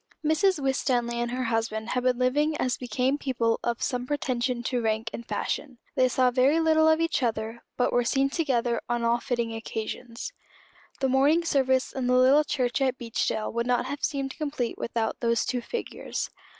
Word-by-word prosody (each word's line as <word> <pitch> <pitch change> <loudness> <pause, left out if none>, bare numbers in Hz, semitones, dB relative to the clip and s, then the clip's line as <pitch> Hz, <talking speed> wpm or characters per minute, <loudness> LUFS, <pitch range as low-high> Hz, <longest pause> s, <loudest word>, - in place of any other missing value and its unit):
Mrs. 320 +3 +3
Winstanley 250 -3 0
and 240 0 -1
her 255 +1 -2
husband 225 -1 -1
had 250 - 0
been 250 -1 +2
living 295 +5 +1
as 255 -1 0
became 255 +3 -1
people 235 -5 0
of 235 -1 -1
some 250 -2 -2
pretension 250 -3 -1
to 245 0 -1
rank 225 0 -1
and 235 - -6
fashion. 265 -5 -3 0.2
They 255 - +4
saw 255 0 +3
very 265 +6 +3
little 315 -1 +4
of 315 0 +4
each 330 -4 +1
other, 225 -1 -2 0.2
but 245 - +1
were 245 - +3
seen 270 +3 +1
together 250 -7 0
on 240 -1 0
all 235 +1 +2
fitting 235 -3 -2
occasions. 230 - -5 0.7
The 265 - +2
morning 290 +6 +3
service 260 -4 +2
in 260 -2 -2
the 250 0 +4
little 265 +4 +6
church 255 -3 -1
at 260 -1 +1
Beechdale 230 -3 -2
would 235 +1 -1
not 250 0 +1
have 285 +2 -5
seemed 275 -2 -2
complete 285 -6 -2
without 230 -1 -2
those 235 -1 +1
two 245 - -1
figures. 470 - -4
250 Hz, 185 wpm, -27 LUFS, 235-275 Hz, 0.7 s, little